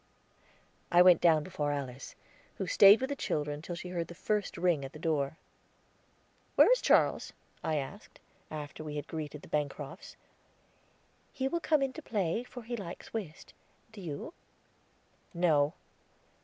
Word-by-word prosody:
I 175 +1 +7
went 180 -2 +7
down 160 -3 +5
before 150 -5 -2
Alice, 135 -2 -5 0.4
who 195 - -3
stayed 200 +5 +7
with 265 +2 -2
the - - -1
children 150 - -2
till 175 +2 -5
she 180 +1 -7
heard 170 -2 -3
the 175 - -10
first 210 +2 -1
ring 170 -5 +2
at 135 - -7
the - - -9
door. 155 -2 -1 1.2
"Where - - +7
is - - +4
Charles?" - - +3 0.3
I 160 -1 0
asked, 150 +9 -6 0.3
after 150 0 -7
we 150 -1 -6
had 145 -1 -4
greeted 150 -2 -6
the - - -11
Bancrofts. 150 +3 -4 1.2
"He 265 0 -2
will 340 +5 -1
come 305 -4 +2
in 270 - +1
time 315 - -8
to - - -22
play, 205 0 0
for 245 -1 -10
he 240 +2 -4
likes 185 -6 -8
whist; 190 -9 -6 0.4
do 215 -2 -10
you?" 165 - -6 1.0
"No." 155 -3 +3
170 Hz, 160 wpm, -31 LUFS, 150-205 Hz, 1.2 s, I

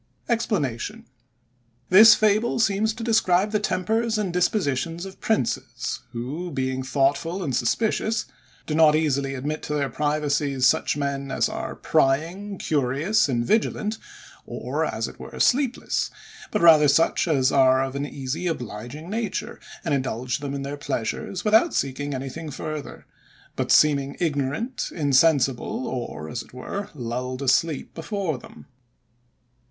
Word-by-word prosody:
EXPLANATION.—This 130 - +2
fable 215 +2 +2
seems 215 -1 +2
to 225 +1 -7
describe 205 -3 +2
the 210 - +1
tempers 220 +3 0
and 195 -5 -2
dispositions 175 - 0
of 190 0 -11
princes, 125 - -1
who, 135 +9 -5
being 130 -3 -2
thoughtful 145 +7 0
and 135 -6 -1
suspicious, 220 - 0 0.4
do 155 - -3
not 155 -1 +5
easily 140 -3 0
admit 150 +4 -3
to 150 - -3
their 140 -2 0
privacies 145 -3 0
such 135 - +2
men 140 -1 -2
as - - +1
are - - -5
prying, 170 +9 0
curious, 145 +8 +1
and 120 -2 0
vigilant, 215 - 0 0.5
or, - - -3
as - - -2
it - - -12
were, - - -9
sleepless; 265 -1 +1 0.4
but 210 - -1
rather 155 -3 +8
such 155 +5 +3
as 135 -5 +2
are 130 -1 +4
of 135 0 -4
an 140 - -2
easy, 140 +6 -4
obliging 125 +1 -5
nature, 215 +2 -3 0.3
and - - 0
indulge 130 -1 -1
them 140 -1 -4
in 140 - -4
their 140 +1 -5
pleasures, 145 - -3
without 220 +10 +4
seeking 140 +1 -2
anything 135 +5 -6
further; 155 0 -6 0.5
but - - -1
seeming 140 -2 +4
ignorant, 160 - -2
insensible, 140 -4 +2
or, 120 - -5
as 120 +5 -4
it - - -16
were, 200 +10 -5
lulled 125 +1 -4
asleep 140 +3 +1
before 165 - -3
them. - - -14
150 Hz, 135 wpm, -24 LUFS, 130-195 Hz, 0.5 s, rather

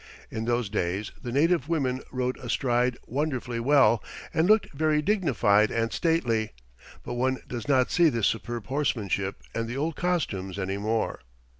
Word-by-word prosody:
In 110 0 -3
those 120 -1 0
days 100 0 -2
the 120 - -5
native 160 +2 +2
women 135 -6 0
rode 125 0 -1
astride 125 0 0
wonderfully 130 -3 -2
well 130 -2 +4 0.3
and 160 +2 +2
looked 215 -6 +4
very 155 +1 +2
dignified 130 - +3
and 115 0 -1
stately, 120 -11 +1 0.5
but - - -5
one 130 +2 0
does 120 0 -5
not 130 -3 +3
see 170 -2 +5
this 115 -6 0
superb 120 0 -2
horsemanship 110 -9 -1
and 115 0 -2
the 120 +3 -4
old 155 +2 -1
costumes 100 - -1
any 95 0 -2
more. 110 +2 -1
125 Hz, 155 wpm, -27 LUFS, 115-150 Hz, 0.5 s, see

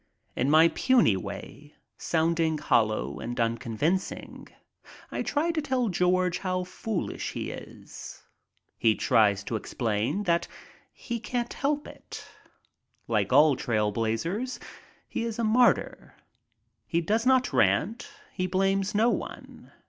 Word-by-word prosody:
In 130 - 0
my 160 +2 +6
puny 250 - +3
way, 100 +10 -8 0.2
sounding 160 -1 +1
hollow 110 - +1
and 120 +2 -5
unconvincing, 115 - -2 0.6
I - - -2
try 310 +3 0
to 325 -2 -1
tell 260 -5 0
George 180 0 +1
how 185 -1 -1
foolish 190 +1 -4
he - - -4
is. - - -10 0.6
He 110 -1 +4
tries 105 -6 +3
to 115 - -4
explain 115 - -1
that 170 -3 +1 0.4
he 235 -2 -5
can't 240 +1 -3
help 290 +1 -1
it. - - -10 0.8
Like - - 0
all 145 +2 +6
trail 105 -4 0
blazers, 140 - -2 0.5
he - - -3
is 230 -1 -3
a 235 - -1
martyr. 235 +3 +2 0.7
He 170 - +1
does 220 +8 0
not 260 -1 +3
rant. 150 - +1 0.2
He 185 -1 -1
blames 195 +2 0
no 225 +3 +4
one. - - -7
170 Hz, 125 wpm, -27 LUFS, -, 0.8 s, my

